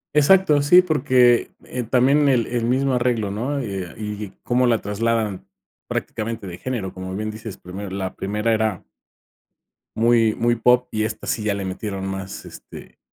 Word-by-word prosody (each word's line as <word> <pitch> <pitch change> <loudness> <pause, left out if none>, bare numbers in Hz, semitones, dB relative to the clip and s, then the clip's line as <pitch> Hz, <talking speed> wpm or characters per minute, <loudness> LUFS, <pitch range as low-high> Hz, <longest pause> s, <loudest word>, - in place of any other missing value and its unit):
Exacto, 150 -1 +5
sí, 180 +6 +6
porque, 130 -7 +3
eh, 125 - -5
también 135 +5 +3
el 120 -4 +3
el 120 -1 -2
mismo 130 +2 +1
arreglo, 120 -5 0
¿no?, 130 +8 -2
eh, 95 -7 -5
y 105 -1 -5
cómo 125 +1 +2
la 115 -2 +3
trasladan 110 -1 -2 0.4
prácticamente 110 -1 -4
de 90 -1 -8
género, 115 -8 -4
como 95 0 -6
bien 110 +1 -3
dices: 110 -1 -8
"Primero, 95 +2 -8
la 95 0 -4
primera 105 +3 -1
era" 110 -3 -1 1.1
"muy, 115 -1 +3
muy 120 +1 +1
pop", 125 +2 +3
y 110 0 -1
esta 110 - -4
sí 110 - -1
ya 105 - +1
le 100 -1 -4
metieron 95 +1 -4
más, 95 0 -6
este, - - -12
115 Hz, 165 wpm, -22 LUFS, 100-125 Hz, 1.1 s, sí